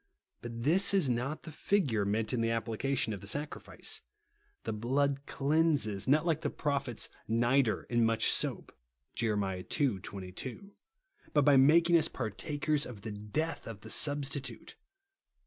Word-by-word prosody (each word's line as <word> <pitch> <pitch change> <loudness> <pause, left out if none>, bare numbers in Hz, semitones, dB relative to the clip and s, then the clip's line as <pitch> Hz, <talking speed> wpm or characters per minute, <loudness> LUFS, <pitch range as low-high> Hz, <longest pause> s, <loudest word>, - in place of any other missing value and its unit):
But 115 -1 -6
this 185 +8 +4
is 160 -10 +3
not 125 +6 -2
the 160 - -8
figure 145 - +1
meant 110 +4 -1
in 120 - 0
the 115 - +1
applica 115 +4 -1
tion 110 - 0
of 100 - -7
the 100 - -7
sacrifice. 145 +8 -2 0.6
The - - -3
blood 135 +5 0
cleanses, 140 - +1
not 150 +4 +3
like 165 -2 +1
the - - -1
prophet's 140 -5 -1 0.2
"nitre 120 +2 +2
and 120 -1 +2
much 115 0 +3
soap - - +1 0.2
" 60 +3 -52
(Jer. 110 -3 0
ii. 100 - -1
22), 100 - -7 0.6
but 145 -2 +4
by 145 -1 +6
making 165 +6 +6
us - - 0
par 110 -4 -4
takers 150 +5 -1
of 110 -5 -10
the 110 - -6
cleatli 105 +11 -4
of 110 -4 -8
the 110 - -6
Substitute. 140 -4 0
130 Hz, 160 wpm, -31 LUFS, 110-145 Hz, 0.6 s, by